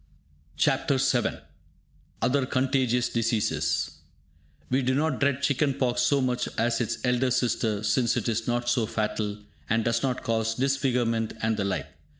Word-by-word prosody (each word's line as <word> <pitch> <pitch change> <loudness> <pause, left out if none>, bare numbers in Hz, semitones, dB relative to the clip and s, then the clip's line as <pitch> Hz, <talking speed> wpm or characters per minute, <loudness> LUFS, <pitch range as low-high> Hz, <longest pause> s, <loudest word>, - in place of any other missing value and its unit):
CHAPTER - - +2
VII - - +1 0.8
OTHER 130 +1 +2
CONTAGIOUS 130 -2 +1
DISEASES 115 -2 0 0.8
We 130 +2 +3
do 130 0 +1
not 150 -1 0
dread 140 -1 +1
chicken 140 0 +1
pox 125 -3 0
so 140 +3 +3
much 125 -1 -1
as 115 +1 +1
its 115 - -1
elder 125 +1 +2
sister, 115 -4 0
since 115 +3 +2
it - - -2
is 115 -1 -1
not 120 0 -1
so 120 -2 +2
fatal, 105 -2 -2 0.3
and 110 0 +1
does 115 0 +1
not 130 -2 -1
cause 115 -2 0
disfigurement 125 -4 0
and 110 0 +2
the 100 -2 -1
like. 100 -2 -1
120 Hz, 155 wpm, -26 LUFS, 115-130 Hz, 0.8 s, We